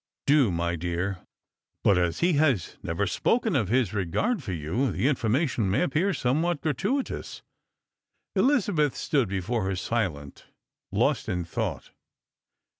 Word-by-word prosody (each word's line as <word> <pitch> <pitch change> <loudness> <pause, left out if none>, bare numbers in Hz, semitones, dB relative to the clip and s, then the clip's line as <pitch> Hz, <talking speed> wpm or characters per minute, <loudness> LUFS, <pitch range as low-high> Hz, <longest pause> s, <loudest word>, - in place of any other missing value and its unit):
" - - -66
Do, 140 -5 +4
my 85 0 -1
dear. 90 +3 -2 0.6
But 95 -3 +4
as 85 -2 0
he 175 0 +3
has 140 - +1
never 85 +5 -1
spoken 220 - +1
of 115 -8 +1
his 120 -4 +2
regard 105 - 0
for 110 - -5
you, 90 - -1
the 130 - 0
information 120 - +1
may 100 - +2
appear 180 +3 +1
somewhat 160 +2 0
gratuitous." 200 - -2 0.9
Elizabeth 195 - +2
stood 135 -9 0
before 100 +4 -1
her 95 0 -1
silent, 90 -8 -3 0.4
lost - - +1
in 90 -1 -1
thought. 85 - -4
120 Hz, 135 wpm, -27 LUFS, -, 0.9 s, Do